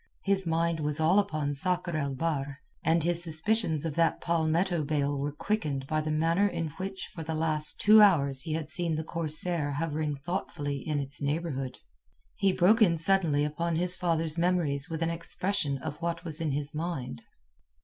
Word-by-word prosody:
His 195 -2 +1
mind 165 0 0
was 150 0 -2
all 165 +6 +4
upon 155 -8 -1
Sakr 175 +3 +4
el 140 -3 -2
Bahr, 145 -2 -2 0.3
and 165 0 +2
his 170 0 +3
suspicions 165 -1 +1
of 160 - -2
that 165 +2 +1
palmetto 170 +1 0
bale 145 -1 -1
were 140 +1 -2
quickened 150 -5 -2
by 155 +2 -1
the 155 - -4
manner 165 +6 +2
in 165 -4 -3
which 190 0 -5
for 165 - -7
the 160 0 -4
last 155 -1 -1
two 215 +1 +7
hours 140 -10 +4
he 155 - -4
had 160 -1 -3
seen 170 -3 +1
the 160 - -3
corsair 160 -1 0
hovering 150 0 -2
thoughtfully 145 -2 -4
in 150 +2 -3
its 140 +1 -2
neighbourhood. 140 -3 -3 0.6
He 195 - +2
broke 195 +6 +3
in 170 -6 +4
suddenly 165 -4 +2
upon 165 +3 -2
his 180 +2 +2
father's 165 -2 -1
memories 165 -6 0
with 165 0 -3
an 165 - 0
expression 170 -2 -1
of 145 +4 -7
what 170 0 -3
was 160 -1 -1
in 160 - -1
his 145 +2 -3
mind. 150 -5 -4
160 Hz, 180 wpm, -28 LUFS, 145-175 Hz, 0.6 s, two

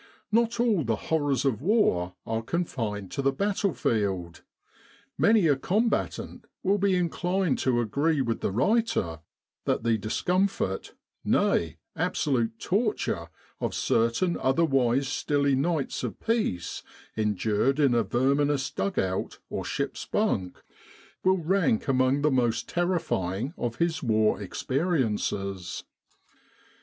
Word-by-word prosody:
Not 230 +1 +2
all 225 -9 +2
the 115 -2 0
horrors 145 +1 0
of 130 -4 +1
war 145 - +2
are 115 0 -1
confined 115 - -3
to - - -2
the 135 0 +2
battlefield; 110 - -1 0.7
many 215 -3 +4
a 145 -3 +4
combatant 210 - -1 0.2
will 200 +2 +2
be 195 -1 +3
inclined 180 -1 0
to 125 -2 +2
agree 140 +7 +1
with 115 -4 0
the - - 0
writer 135 - +1 0.5
that - - 0
the 115 -2 +2
discomfort, 175 - -1 0.3
nay, 80 -4 +1 0.2
absolute 120 -6 0
torture, 195 - -1 0.3
of - - -2
certain 115 +10 +1
otherwise 135 -2 +2
stilly 140 +1 +1
nights 150 +1 -1
of - - -4
peace 220 - -1 0.3
endured 110 +5 +1
in 140 -4 +4
a 120 - +3
verminous 135 +5 +1
dug 200 -2 -2
out 95 0 -1
or - - -3
ship's - - -3
bunk, 90 -1 -1 0.6
will 190 0 +4
rank 170 - +1
among 130 +1 +2
the 150 - +3
most 120 -3 +1
terrifying 145 - -1
of 120 -1 -3
his 165 +1 0
war 110 -4 +2
experiences. 105 - -1
135 Hz, 120 wpm, -27 LUFS, 110-175 Hz, 0.7 s, many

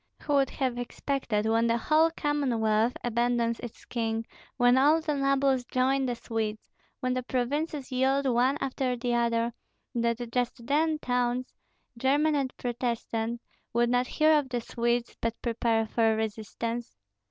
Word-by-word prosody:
Who 295 - -1
would 275 -2 +3
have 255 -3 -2
expected, 245 -3 -2
when 225 +1 +3
the 230 0 +2
whole 310 +7 +3
Commonwealth 245 -8 +1
abandons 235 0 +1
its 240 -2 -9
king, 225 -1 -2 0.3
when 245 0 +5
all 290 +5 +5
the 310 -2 -2
nobles 275 -2 +2
join 265 +2 +1
the 245 - -1
Swedes, 220 -2 -4 0.3
when 255 -1 0
the 255 - -1
provinces 270 +3 -2
yield 265 +2 +2
one 255 +2 +2
after 260 -2 -1
the 240 0 -1
other, 235 0 +1 0.4
that 235 0 -1
just 245 0 -2
then 310 +4 +2
towns, 250 -2 -1 0.5
German 290 +5 +3
and 275 -3 0
Protestant, 235 -1 -2 0.3
would 240 +1 +2
not 250 0 +2
hear 310 0 +4
of 275 -3 -5
the 245 -1 -2
Swedes 235 +1 -1
but 230 0 -2
prepare 230 -1 +1
for 225 0 +2
resistance? 220 - -4
245 Hz, 150 wpm, -28 LUFS, 235-270 Hz, 0.5 s, when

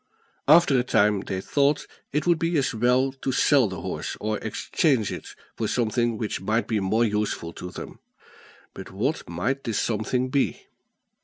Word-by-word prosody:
After 150 -3 +6
a - - +1
time 105 -4 +3
they 95 -1 -4
thought 140 +6 +1 0.3
it 150 - -1
would 170 -2 +3
be 165 0 +1
as 140 -2 +1
well 125 +4 +2
to 135 0 -4
sell 135 -1 +4
the 95 -3 -6
horse, - - -4
or 105 0 -2
exchange 115 - 0
it - - -8 0.2
for - - -2
something 120 -1 0
which 105 -4 -3
might 110 +4 0
be 110 -2 0
more 105 +4 +2
useful 105 -6 -2
to 90 - -7
them. - - -9 0.7
But - - -9
what 120 - -2
might 125 +12 -2
this 115 -3 -2
something 120 +3 -1
be? 135 +1 0
120 Hz, 170 wpm, -25 LUFS, 105-135 Hz, 0.7 s, After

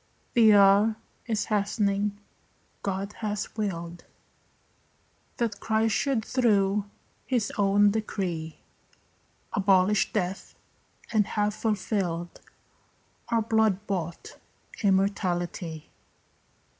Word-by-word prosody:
The 220 -3 +6
hour 200 +2 +5 0.3
is 220 -3 0
hastening. 205 -1 0 0.6
God 195 +1 -3
has 210 -2 -3
willed 175 -5 -4 1.3
That 225 -4 -2
Christ 220 0 +1
should 250 -2 0
through 205 -5 +2 0.4
his 245 -5 0
own 205 0 +4
decree 180 -7 -3 1.0
Abolish 195 +1 +3
death 190 -2 -3 0.6
and 210 -3 +3
have 210 0 0
fulfilled 195 -5 -2 0.9
Our 230 -1 +2
blood 220 -3 +1
bought 175 -4 -5 0.4
immortality. 185 -5 -1
205 Hz, 80 wpm, -27 LUFS, 190-215 Hz, 1.3 s, The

